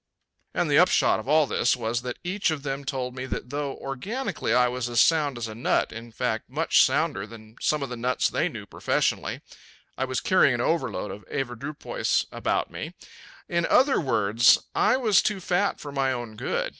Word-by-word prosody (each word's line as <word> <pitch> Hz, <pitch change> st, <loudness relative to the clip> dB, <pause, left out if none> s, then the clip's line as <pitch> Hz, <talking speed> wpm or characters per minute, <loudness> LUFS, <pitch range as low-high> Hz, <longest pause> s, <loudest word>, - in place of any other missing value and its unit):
And -, -, +1 dB
the -, -, +4 dB
upshot -, -, +4 dB
of -, -, -9 dB
all 155 Hz, 0 st, +5 dB
this 125 Hz, -, +1 dB
was 120 Hz, -1 st, -2 dB
that 125 Hz, 0 st, -5 dB
each 185 Hz, +2 st, 0 dB
of 155 Hz, -3 st, -3 dB
them 140 Hz, 0 st, -3 dB
told 130 Hz, -2 st, -3 dB
me 130 Hz, 0 st, -5 dB
that 125 Hz, -, -5 dB
though 145 Hz, -1 st, -3 dB
organically 195 Hz, -, -4 dB
I 125 Hz, 0 st, +4 dB
was 125 Hz, 0 st, -3 dB
as 120 Hz, -, +1 dB
sound 150 Hz, -5 st, +3 dB
as 115 Hz, -1 st, -3 dB
a 110 Hz, -, -7 dB
nut 115 Hz, +3 st, 0 dB
in 115 Hz, +1 st, -9 dB
fact 115 Hz, -1 st, -2 dB
much -, -, +3 dB
sounder 95 Hz, +2 st, +1 dB
than 110 Hz, 0 st, -13 dB
some 150 Hz, -2 st, +1 dB
of 135 Hz, -, -5 dB
the 125 Hz, -, -5 dB
nuts 125 Hz, +2 st, 0 dB
they -, -, 0 dB
knew -, -, -8 dB
professionally -, -, -1 dB, 0.6 s
I 130 Hz, -, +1 dB
was 130 Hz, -1 st, -2 dB
carrying 165 Hz, -9 st, +3 dB
an -, -, -4 dB
overload 130 Hz, -8 st, -1 dB
of 105 Hz, -, -9 dB
avoirdupois 135 Hz, +2 st, -2 dB
about -, -, -1 dB
with -, -, -22 dB
me. -, -, -6 dB, 0.5 s
In 170 Hz, 0 st, 0 dB
other 265 Hz, +2 st, +4 dB
words, 115 Hz, -4 st, +4 dB
I 220 Hz, +5 st, +3 dB
was 220 Hz, -7 st, +4 dB
too 210 Hz, -2 st, -1 dB
fat 185 Hz, +2 st, 0 dB
for 145 Hz, -, -7 dB
my 135 Hz, -1 st, 0 dB
own 120 Hz, -3 st, -5 dB
good. -, -, -2 dB
130 Hz, 200 wpm, -26 LUFS, 120-155 Hz, 0.6 s, all